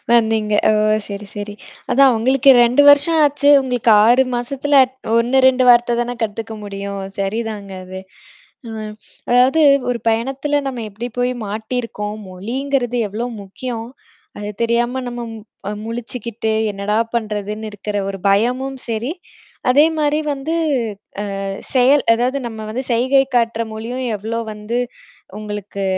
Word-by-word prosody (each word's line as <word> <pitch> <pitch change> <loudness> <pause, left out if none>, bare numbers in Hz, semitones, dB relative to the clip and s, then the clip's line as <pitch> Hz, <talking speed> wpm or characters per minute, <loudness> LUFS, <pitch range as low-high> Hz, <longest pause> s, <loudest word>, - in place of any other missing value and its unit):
வந்தீங்க. 220 -2 +2 0.2
ஓ! - - +4 0.4
சரி, 200 0 -6
சரி. 205 0 -5 0.4
அதான் 275 +1 +6
அவங்களுக்கு 260 +4 +4
2 250 +4 +4
வருஷம் 320 +3 +4
ஆச்சு, 285 0 +2
உங்களுக்கு 250 -3 0
6 245 +4 +5
மாசத்துல 275 +4 +1
அ் 255 - -11 0.3
1 245 +3 +2
2 255 -1 +2
வார்த்த 240 0 +5
தானே 240 +1 -2
கத்துக்க 225 +1 -4
முடியும். 200 0 -5 0.2
சரிதாங்க 205 0 -3
அது. 185 +1 -8 0.7
அ - - -7 0.6
அதாவது 255 +6 +4 0.3
ஒரு 240 - -1
பயணத்தில 270 +6 0
நம்ம 245 -3 -5
எப்படி 225 +5 -6
போய் 245 +1 +1
மாட்டியிருக்கோம். 215 -1 -4
மொழிங்கிறது 245 +6 -2
எவ்ளோ 220 +4 -4 0.2
முக்கியம். 225 +4 -6 0.5
அது 205 0 -5
தெரியாம 240 +2 +1
நம்ம 240 0 -6 0.5
அ - - -2
முழிச்சுக்கிட்டு 230 -1 -4 0.2
என்னடா 205 +1 -2 0.2
பண்றதுன்னு 215 -1 -3
இருக்கிற 205 0 -5
ஒரு 195 0 -5
பயமும் 250 +7 +1
சரி. 230 +6 -2 0.6
அதே 285 +4 +6
மாரி 300 0 +1
வந்து 280 +3 -4 0.9
அ - - -3 0.3
செயல் 265 +2 +4
அதாவது 250 +4 0
நம்ம 220 -2 -7
வந்து 255 +4 -3
செயகை 260 +4 +3
காட்டுற 230 -1 +1
மொழியும் 235 +4 -5
எவ்ளோ 225 +3 -4
வந்து 210 +3 -4 0.6
உங்களுக்கு 205 -2 -6
235 Hz, 130 wpm, -19 LUFS, 215-260 Hz, 0.9 s, அதான்